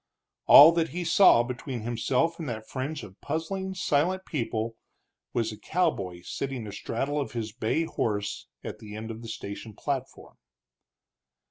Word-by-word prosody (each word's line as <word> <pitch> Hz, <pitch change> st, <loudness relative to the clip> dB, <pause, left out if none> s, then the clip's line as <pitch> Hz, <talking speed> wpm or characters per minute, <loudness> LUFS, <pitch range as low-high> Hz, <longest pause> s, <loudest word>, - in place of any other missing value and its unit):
All 150 Hz, +3 st, +11 dB
that 165 Hz, -1 st, 0 dB
he 180 Hz, +1 st, -3 dB
saw 170 Hz, -7 st, +6 dB
between 125 Hz, 0 st, -5 dB
himself 125 Hz, +8 st, 0 dB
and 155 Hz, -5 st, -4 dB
that 110 Hz, -2 st, -5 dB
fringe 140 Hz, +3 st, -4 dB
of 95 Hz, 0 st, -12 dB
puzzling, 190 Hz, +5 st, -3 dB
silent 185 Hz, +3 st, +1 dB
people 115 Hz, -5 st, -2 dB, 0.6 s
was 115 Hz, -2 st, 0 dB
a 105 Hz, -, -10 dB
cowboy 100 Hz, -, -1 dB
sitting 130 Hz, +2 st, -4 dB
astraddle 125 Hz, +8 st, -2 dB
of 140 Hz, -, -5 dB
his 115 Hz, -2 st, -3 dB
bay 115 Hz, +8 st, 0 dB
horse 105 Hz, -9 st, -2 dB, 0.2 s
at -, -, -6 dB
the 105 Hz, -1 st, -9 dB
end 110 Hz, +1 st, -5 dB
of 115 Hz, +1 st, -8 dB
the 115 Hz, -, -8 dB
station 105 Hz, -1 st, -7 dB
platform. 135 Hz, 0 st, -5 dB
125 Hz, 150 wpm, -28 LUFS, 110-160 Hz, 0.6 s, All